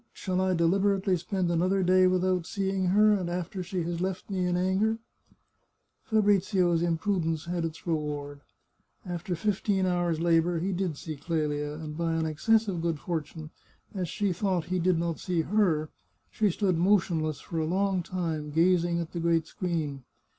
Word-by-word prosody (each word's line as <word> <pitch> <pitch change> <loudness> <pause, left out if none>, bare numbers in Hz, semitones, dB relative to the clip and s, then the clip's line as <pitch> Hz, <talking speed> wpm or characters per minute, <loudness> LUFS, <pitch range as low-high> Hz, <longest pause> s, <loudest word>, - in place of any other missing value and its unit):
shall 185 -1 -2
I 185 -1 +2
deliberately 190 +3 +2
spend 180 0 -1
another 185 +3 +2
day 185 +1 +5
without 185 -1 +1
seeing 195 -2 -1
her, 210 +4 +5
and 185 -4 -1
after 180 +2 -3
she 180 -1 -3
has 170 +1 -3
left 190 +1 -3
me 185 -2 0
in 175 0 +1
anger? 190 +5 +1 0.5
" - - -48
Fabrizio's 195 -5 +3
imprudence 165 -2 0
had 175 0 -2
its 160 -1 -5
reward; 145 -3 -3 0.6
after 175 0 -3
fifteen 195 +1 0
hours' 175 -3 0
labour 170 0 +2
he 185 +4 -1
did 175 -4 -2
see 155 0 -6
Qelia, 150 -1 -2
and, 155 -1 -7
by 165 0 -1
an 160 0 0
excess 220 +8 +2
of 180 -4 -2
good 165 -2 -1
fortune, 160 -1 -5 0.4
as 185 -5 -3
she 205 0 0
thought 180 -2 -1
he 180 +1 -1
did 180 0 +2
not 170 -1 -2
see 175 -3 0
her, 165 -5 +1 0.4
she 215 -2 +2
stood 185 -2 0
motionless 170 -5 +2
for 165 - -5
a 160 - 0
long 190 +2 +1
time, 165 -4 -3
gazing 170 +2 +2
at 170 -1 -4
the 170 - -4
great 165 -1 +2
screen. 160 -6 -3
175 Hz, 170 wpm, -28 LUFS, 165-190 Hz, 0.6 s, day